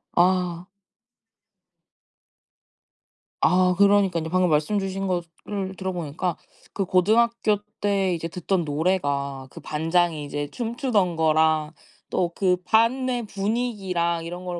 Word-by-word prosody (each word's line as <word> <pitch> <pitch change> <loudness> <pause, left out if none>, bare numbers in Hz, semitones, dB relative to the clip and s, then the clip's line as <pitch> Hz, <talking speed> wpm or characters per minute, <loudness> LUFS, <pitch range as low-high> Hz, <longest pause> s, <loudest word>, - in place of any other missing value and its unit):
아. 180 0 +2 2.7
아 180 +1 +4
그러니깐요. 200 -5 +3
방금 185 0 +2
말씀 155 +7 +1
주신 195 0 -3
거를 185 +2 -4
들어 190 -1 -3
보니까 170 +1 -3 0.4
그 195 - -1
고등학교 215 +4 +2 0.2
때 195 -3 +1
이제 165 0 -3
듣던 180 0 -1
노래가 145 -4 -1
그 - - -12
반장이 160 0 0
이제 145 0 -4
춤추던 230 - 0
거랑 155 -1 +2 0.4
또 175 -2 -1
그 180 -2 +2
반의 245 +3 +2
분위기랑 195 -6 -1
이런 175 +2 -7
거를 175 -1 -4
180 Hz, 230 characters per minute, -24 LUFS, 165-200 Hz, 2.7 s, 아